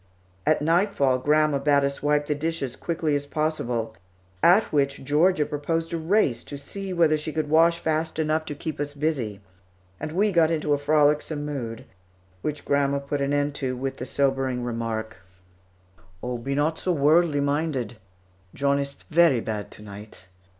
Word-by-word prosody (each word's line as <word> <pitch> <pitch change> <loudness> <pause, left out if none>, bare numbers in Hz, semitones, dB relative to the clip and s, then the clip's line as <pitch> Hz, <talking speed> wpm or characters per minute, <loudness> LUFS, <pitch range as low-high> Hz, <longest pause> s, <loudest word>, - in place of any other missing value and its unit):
At 155 -1 +3
nightfall, 165 -6 +2
grandma 150 +1 +2
bade 140 0 +3
us 140 0 -2
wipe 150 0 +2
the 150 - 0
dishes 145 -4 -3
quickly 165 -3 -1
as 145 0 -3
possible, 125 -8 -2 0.5
at 185 +6 +6
which 140 -2 +1
Georgia 150 +4 +3
proposed 165 +3 -2
a - - 0
race 160 - +1
to 145 - -7
see 195 +7 -6
whether 165 -3 +3
she 155 +1 -4
could 155 -1 -2
wash 165 +2 +5
fast 160 -1 -1
enough 155 0 +1
to 150 - -5
keep 155 +1 -5
us 145 0 -3
busy, 135 -10 -2 0.6
and 155 - -4
we 205 +4 +2
got 165 -3 +4
into 155 -2 0
a 145 - +1
frolicsome 150 0 +2
mood, 120 -6 -5 0.6
which 150 +5 -4
grandma 140 0 +2
put 140 +1 -3
an 140 0 0
end 145 0 +1
to 130 -3 -3
with 135 +1 -3
the 125 - -6
sobering 135 -2 0
remark: 115 -2 -3 1.1
"Oh, 125 -1 -3
be 135 +4 -3
not 150 +3 0
so 185 - -1
worldly 155 +1 +3
minded. 140 -5 -1 0.6
John 140 0 +1
ist 140 0 -6
very 160 -6 +5
bad 105 -2 -4
to 105 - -13
night. 100 -2 -11
145 Hz, 170 wpm, -25 LUFS, 135-160 Hz, 1.1 s, at